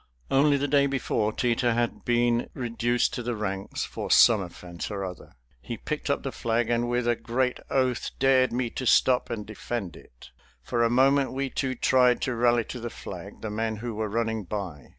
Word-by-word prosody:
Only 140 +1 +4
the 140 +1 -1
day 140 0 +3
before 115 -5 0
Teter 120 +1 +1
had 120 0 -1
been 120 0 +2
reduced 120 -1 0
to - - -3
the 120 0 -3
ranks 95 -2 -3
for - - -6
some 110 -3 +6
offense 85 -1 -7
or 100 -2 -4
another. 90 -2 -8 0.3
He 115 - -6
picked 150 +4 -4
up 140 - 0
the 135 - -3
flag 115 0 -1
and 120 0 +1
with 120 0 0
a 120 - +3
great 125 +2 -1
oath 130 -2 0
dared 130 -1 +4
me 120 -1 -1
to 130 - -4
stop 125 +1 +4
and 110 -3 -4
defend 105 -3 -5
it. - - -16 0.3
For 115 - 0
a 115 - +3
moment 135 +3 +3
we 135 0 -2
two 130 -1 -2
tried 125 0 +3
to 130 - -1
rally 120 0 +3
to 125 - -7
the 120 0 -4
flag 95 -2 -9
the 110 - -4
men 110 +1 -1
who 115 +2 -5
were 110 0 -3
running 110 0 -1
by. 90 -8 -6
120 Hz, 200 wpm, -26 LUFS, 110-130 Hz, 0.3 s, some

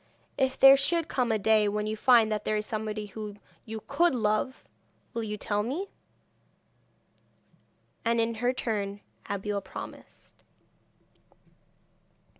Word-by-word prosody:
If 265 -1 0
there 270 0 +10
should 325 +4 +1
come 250 -6 0
a 220 - +2
day 215 0 +3
when 210 +1 -1
you 215 0 -2
find 225 -1 +5
that 210 -1 -1
there 215 - 0
is 210 - -2
somebody 215 -1 -3
whom 210 0 -8 0.3
you 220 -1 -6
could 330 +2 +2
love, 220 +3 0 0.5
will 230 - -2
you 210 -1 -4
tell 205 0 -1
me?' 290 - -3 2.1
And 230 0 +1
in 230 0 +1
her 245 +1 +3
turn 205 -5 -3 0.3
Abeille 200 0 -2
promised. 190 - -11
220 Hz, 130 wpm, -28 LUFS, 210-250 Hz, 2.1 s, there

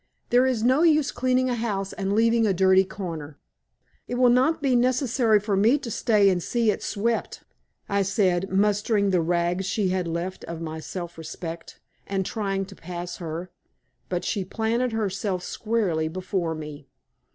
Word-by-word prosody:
There 250 +2 +5
is 240 -4 0
no 260 +5 +4
use 310 -4 +4
cleaning 255 0 +1
a 250 - 0
house 205 -5 -2
and 195 0 -2
leaving 230 +1 +3
a 195 - +2
dirty 190 +1 +5
corner." 165 -7 -7 0.7
"It 245 - -3
will 250 -1 +5
not 260 +6 +3
be 275 -4 +1
necessary 245 -3 +3
for 205 0 -1
me 220 +8 +4
to 265 -5 -6
stay 210 -3 +3
and 180 -1 0
see 230 +3 +1
it - - -5
swept," 230 +2 -2 0.4
I 200 0 +1
said, 195 -2 +1
mustering 205 +1 +2
the 180 -2 +3
rags 175 +2 0
she 200 -2 0
had 180 -1 -1
left 170 +3 -4
of 170 -1 -6
my 160 -1 -5
self 175 +1 -7
respect, 165 +1 -7 0.3
and 195 -1 -1
trying 195 -2 -2
to 195 0 -13
pass 175 0 -6
her. 170 +1 -6 0.6
But 180 -1 -2
she 200 -3 -1
planted 230 +5 -1
herself 200 -3 -2
squarely 200 -9 -1
before 180 -1 -2
me. 150 -2 -8
195 Hz, 170 wpm, -25 LUFS, 175-230 Hz, 0.7 s, There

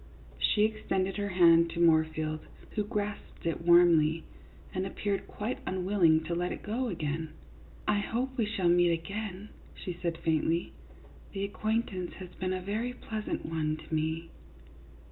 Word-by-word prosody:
She 210 - +3
extended 195 -3 -1
her 205 0 -1
hand 170 -2 +6
to 170 - -5
Moorfield, 155 -2 +3 0.3
who 210 - 0
grasped 210 -4 -4
it 165 0 -1
warmly, 165 -2 +5 0.5
and 185 - -1
appeared 195 +1 -2
quite 230 +5 -4
unwilling 180 -4 +3
to 165 +2 -3
let 175 +1 -1
it - - -6
go 240 +5 -1
again. 160 -4 -3 0.3
" - - -22
I 210 -1 +3
hope 250 +5 -2
we 230 -5 +1
shall 195 -4 0
meet 175 0 +5
again," 195 +4 -5 0.3
she 180 - -5
said, 170 -1 -3
faintly. 160 +1 0 0.3
" - - -21
The 195 -1 -2
acquaintance 205 -2 -1
has 185 -1 -9
been 185 0 -2
a 185 0 -2
very 220 +6 -2
pleasant 220 -3 -4
one 155 -1 -1
to 155 +1 -10
me." 160 +1 -1
180 Hz, 160 wpm, -30 LUFS, 165-210 Hz, 0.5 s, hand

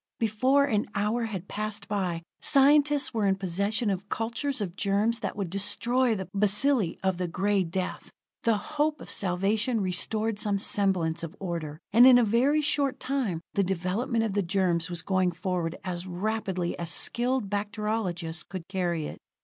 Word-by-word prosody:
Before 255 +6 +3
an 215 -7 0
hour 215 +4 0
had 195 -4 -5
passed 215 0 -4
by, 180 -5 -2 0.2
scientists 290 0 +4
were 215 -3 +1
in 195 - +3
possession 200 +4 -1
of 195 +1 -4
cultures 235 +5 -2
of 185 -4 -4
germs 210 +4 +1
that - - -4
would 195 -5 -4
destroy 235 +5 +1
the 190 -2 -5
bacilli 210 0 +2
of 190 -2 +1
the 180 0 -2
Gray 195 +3 +1
Death. 180 +2 -4 0.3
The 225 -2 +2
hope 300 +6 -1
of - - -9
salvation 205 +6 0
restored 215 +3 -1
some 205 -2 +1
semblance 185 -5 +1
of 165 -1 -7
order; 165 -5 -4 0.2
and 240 +3 +8
in 255 -1 +8
a 245 - +4
very 250 +8 +3
short 280 -2 +1
time 250 -11 -2
the 200 - +2
development 195 +6 -1
of 220 -3 -1
the 205 - +1
germs 175 -2 0
was 175 -1 -4
going 185 -2 +1
forward 175 -1 -2
as 180 0 -4
rapidly 185 -1 -2
as 170 -1 -4
skilled 245 +4 +1
bacteriologists 205 -5 -2
could 185 -3 -7
carry 175 -5 -1
it. - - -7
200 Hz, 165 wpm, -27 LUFS, 180-230 Hz, 0.3 s, and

